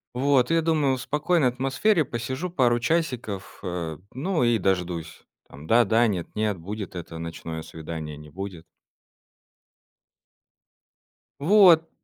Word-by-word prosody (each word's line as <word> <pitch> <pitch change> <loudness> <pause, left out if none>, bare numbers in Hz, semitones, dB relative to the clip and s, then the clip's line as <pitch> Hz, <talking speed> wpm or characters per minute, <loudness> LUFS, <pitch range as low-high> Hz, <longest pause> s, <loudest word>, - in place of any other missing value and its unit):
Вот, 130 0 +3
и - - +2
я 165 - +3
думаю, 155 -5 +2
в 125 - -6
спокойной 150 -1 +1
атмосфере 135 - +1
посижу 130 +9 -4
пару 125 -8 +2
часиков, 120 - -2
э, 85 -4 -4 0.2
ну, 155 +4 0
и 120 -1 +3
дождусь. 90 -4 -2 0.3
Там 75 +3 -12
да-да, 115 +1 +4
нет 90 -6 -2
нет, 105 -2 0
будет 100 +3 -6
это 85 -1 -7
ночное 80 -1 -6
свидание, 80 -1 -7
не 75 +1 -12
будет. 90 0 -7 2.8
Вот. 170 -1 +6
120 Hz, 125 wpm, -25 LUFS, 90-145 Hz, 2.8 s, Вот